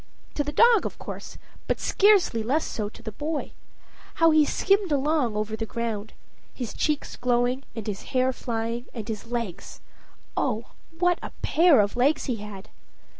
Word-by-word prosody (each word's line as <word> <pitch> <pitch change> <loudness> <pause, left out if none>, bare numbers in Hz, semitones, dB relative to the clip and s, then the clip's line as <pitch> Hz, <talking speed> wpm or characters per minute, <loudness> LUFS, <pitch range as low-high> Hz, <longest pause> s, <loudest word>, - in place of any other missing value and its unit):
To 290 - 0
the 290 - -3
dog 465 +4 +5
of - - -10
course, - - -8 0.3
but - - 0
scarcely 395 - +4
less 270 +8 +1
so 210 -2 -3
to 230 - -15
the 220 - -5
boy. 295 +7 -3 0.6
How 330 -1 +5
he 310 -1 +5
skimmed 390 +3 +2
along 285 -5 +1
over 215 +1 -2
the 220 0 -4
ground 220 -2 -4 0.4
his 245 -5 -5
cheeks 300 -2 -1
glowing, 245 +1 +1
and 225 -3 -5
his 205 -3 -4 0.2
hair 255 +1 +3
flying, 235 0 -3
and 220 -3 -5
his 220 0 -5
legs 230 -7 -5 0.6
oh, 230 -2 0 0.3
what 355 0 +2
a - - -5
pair 330 -5 +5
of 200 0 -1
legs 270 +5 +2
he 245 -4 -1
had! 210 -1 -9
245 Hz, 170 wpm, -26 LUFS, 220-305 Hz, 0.6 s, dog